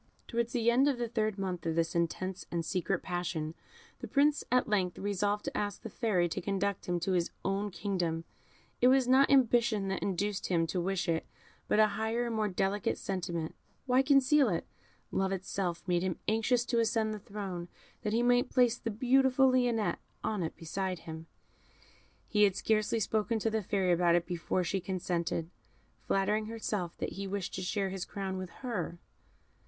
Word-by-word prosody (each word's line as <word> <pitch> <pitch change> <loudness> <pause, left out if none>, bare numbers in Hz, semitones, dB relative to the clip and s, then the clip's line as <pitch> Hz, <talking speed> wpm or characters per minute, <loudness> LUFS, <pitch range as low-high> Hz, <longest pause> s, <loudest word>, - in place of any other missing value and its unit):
Towards 235 0 -1
the 235 -2 +3
end 260 +4 +4
of 280 -3 +2
the 240 -1 -1
third 215 -2 -1
month 185 -3 -3
of 160 - 0
this 165 0 +1
intense 175 +2 -2
and 170 -1 -2
secret 185 -1 -1
passion, 175 -3 -3 0.5
the - - -6
Prince 290 +1 +3
at 250 0 +3
length 190 -5 +1
resolved 205 +1 -1
to - - -4
ask 205 -1 -2
the 225 - -6
Fairy 200 -8 +1
to - - -3
conduct 200 +1 -1
him 175 -1 0
to 190 - 0
his 175 -2 +1 0.2
own 195 +2 0
kingdom. 175 -5 -2 0.6
It 245 - +6
was 260 -1 +5
not 265 +2 +5
ambition 235 -6 +3
that 190 - -2
induced 200 +1 -1
him 170 -2 +2
to 175 +2 -2
wish 195 +1 -1
it, 165 -1 0 0.4
but - - +2
a 215 - +8
higher 220 +3 -1
and 235 -1 -2
more 215 -1 +1
delicate 195 +1 0
sentiment. 170 -4 -3 0.3
Why 255 0 +4
conceal 275 -1 +4
it? 170 -3 -1 0.5
Love 190 0 0
itself 185 -2 -2
made 175 -1 +2
him 185 -2 -1
anxious 230 +2 +2
to 240 -1 +1
ascend 220 -1 +1
the 215 - -5
throne, 195 -4 -6 0.3
that 210 - -2
he 230 +2 +2
might 245 +1 +3
place 245 -2 +3
the 230 - -3
beautiful 265 +3 +4
Lionette 245 -4 +1 0.2
on 210 -3 -1
it 160 - -3
beside 185 +1 -3
him. 160 0 -7 1.0
He 210 - +1
had 195 -2 +1
scarcely 215 +1 +1
spoken 220 +2 0
to 220 +1 0
the 220 0 0
Fairy 190 -2 +1
about 175 0 +4
it 175 -1 +2
before 175 +1 -1
she 190 +2 -1
consented, 175 -2 -2 0.6
flattering 210 +2 +1
herself 210 -6 -3
that - - -2
he 195 +1 -5
wished 195 -1 -3
to 185 - -3
share 195 +1 -1
his 190 -1 -3
crown 190 -1 -4
with 185 -1 -5 0.2
her. 180 -8 -3
200 Hz, 185 wpm, -31 LUFS, 180-230 Hz, 1.0 s, a